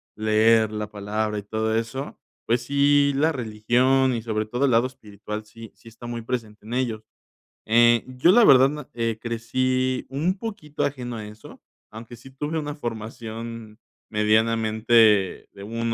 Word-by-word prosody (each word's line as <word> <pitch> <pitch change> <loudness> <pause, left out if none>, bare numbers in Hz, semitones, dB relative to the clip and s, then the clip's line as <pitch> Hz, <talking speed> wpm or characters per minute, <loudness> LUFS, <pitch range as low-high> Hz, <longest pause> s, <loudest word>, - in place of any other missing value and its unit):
leer 110 +1 +3
la 105 -1 -4
palabra 105 +1 -3
y - - -9
todo 110 +2 -2
eso, 115 +5 -4 0.3
pues 120 +1 +1
sí, 140 +1 +3
la 155 +4 +2
religión 125 +2 +1
y 115 - -2
sobre 110 -1 -2
todo 120 +5 -1
el 130 - +2
lado 115 +2 +4
espiritual 105 -4 -8
sí 115 0 -12
sí - - -21
está 115 +1 -12
muy 120 -1 -5
presente 110 -3 -5
en 120 - -4
ellos. 115 -4 -2 0.6
Eh, 120 +1 +4
yo 130 +7 +3
la 240 +3 +6
verdad 135 -6 +7
na 150 -1 -8 0.3
crecí 130 +3 -1
un 160 +8 -1
poquito 200 -9 -5
ajeno 125 -4 -3
a 110 - -7
eso, 105 +1 -13 0.3
aunque 115 +2 -10
sí 130 +3 -15
tuve 145 +4 -4
una 150 -1 -3
formación 115 -2 -7 0.3
medianamente 110 -1 +2
de 100 - -11
1 115 +2 -3
115 Hz, 160 wpm, -24 LUFS, 110-130 Hz, 0.6 s, verdad